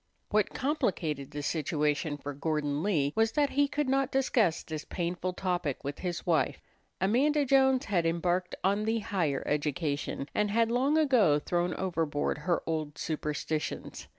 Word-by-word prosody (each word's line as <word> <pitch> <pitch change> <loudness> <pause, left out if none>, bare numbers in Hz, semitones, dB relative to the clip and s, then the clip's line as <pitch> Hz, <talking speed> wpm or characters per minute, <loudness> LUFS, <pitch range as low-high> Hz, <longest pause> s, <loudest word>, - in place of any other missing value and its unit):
What 210 -1 +1
complicated 165 - -1
the 145 0 -5
situation 150 0 0
for 145 0 -6
Gordon 145 0 -1
Lee 150 -8 +1
was 225 0 +2
that 290 -2 +2
he 285 +1 +3
could 295 0 -1
not 270 0 +2
discuss 235 -10 +2
this 155 -1 -5
painful 180 +1 -3
topic 180 -7 -2
with 140 0 -5
his 175 -2 -4
wife. 165 -3 +1 0.4
Amanda 280 +10 +3
Jones 265 0 +4
had 175 -5 +1
embarked 175 +2 0
on 200 +3 +2
the 225 +1 +1
higher 170 -10 -1
education, 145 -1 -1
and 210 0 +1
had 230 +2 +2
long 270 +6 +2
ago 245 - +4
thrown 175 +3 -1
overboard 165 -6 -1
her 170 +3 0
old 155 -2 -3
superstitions. 150 0 -3
175 Hz, 150 wpm, -30 LUFS, 150-225 Hz, 0.4 s, Jones